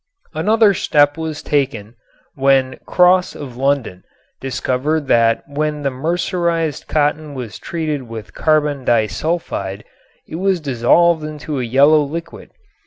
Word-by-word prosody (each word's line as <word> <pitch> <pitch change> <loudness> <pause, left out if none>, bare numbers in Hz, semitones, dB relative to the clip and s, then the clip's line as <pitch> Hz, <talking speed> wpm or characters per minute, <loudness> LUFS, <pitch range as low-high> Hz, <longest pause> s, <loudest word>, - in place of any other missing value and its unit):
Another 210 +6 +3
step 145 -4 +2
was 160 -2 -5
taken 130 -7 -1 0.4
when 135 -1 +2
Cross 180 0 +3
of 130 -4 -8
London 135 -8 -1 0.4
discovered 135 +3 -1
that 115 -2 +2
when 150 +1 -3
the 140 - 0
mercerized 165 +2 -1
cotton 150 0 -1
was 120 -5 -7
treated 150 -7 -4
with 110 -2 -8
carbon 150 -3 +1
disulfide 110 - -1 0.4
it 160 - -6
was 190 0 +1
dissolved 155 +4 +2
to 150 -3 -4
a - - -2
yellow 140 +6 +5
liquid. 160 +4 -6
145 Hz, 120 wpm, -18 LUFS, 130-160 Hz, 0.4 s, yellow